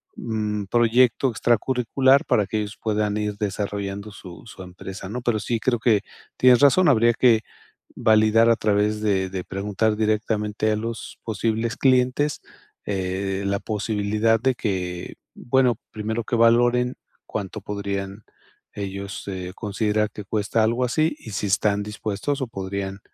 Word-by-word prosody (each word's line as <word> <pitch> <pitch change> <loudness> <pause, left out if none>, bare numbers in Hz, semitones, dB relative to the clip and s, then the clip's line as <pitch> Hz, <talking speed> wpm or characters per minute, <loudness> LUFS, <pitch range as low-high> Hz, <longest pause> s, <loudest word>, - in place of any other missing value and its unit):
mm, 105 -2 -3
proyecto 120 +4 +3
extra 120 +1 +2
curricular, 130 +3 +2
para 105 - +2
que 110 +3 -1
ellos 105 0 -5
puedan 105 -1 0
ir 105 -1 -2
desarrollando 100 0 -3
su 90 -3 -12
su 95 -4 -10
empresa, 95 +1 -9
¿no? 125 +4 -4
Pero 120 -3 0
sí 115 +2 -2
creo, 120 +1 0
que, 110 -3 +3 0.4
tienes 125 -1 +6
razón. 145 +6 +5
Habría 120 -3 +4
que 115 -2 +4 0.5
validar, 110 0 +4
a 115 - +5
través 105 0 +1
de 95 -3 +1
de 95 -1 -4
preguntar, 105 +3 -1
directamente 110 0 0
a - - +1
los 115 +1 -6
posibles 115 +1 -1
clientes, 130 +2 +2 0.4
eh, 95 0 -2
la 100 0 0
posibilidad 110 +1 0
de 130 +3 +2
que 90 -6 -3 0.2
Bueno, 125 -2 +2
primero 110 +2 -3
que 120 - -2
valoren, 120 +2 +3 0.3
cuánto 105 0 -5
podrían, 100 0 -4 0.5
ellos, 100 0 -6
eh, 90 -2 -5
considerar, 105 0 -1
que 105 - -8
cuesta 110 +2 0
algo 120 +3 +1
así. 155 +6 +1
Y 110 - -10
si 105 - -3
están 100 +1 +1
dispuestos, 105 +6 -3
o 130 - -1
podrían, 95 -1 -5
110 Hz, 150 wpm, -23 LUFS, 100-115 Hz, 0.5 s, tienes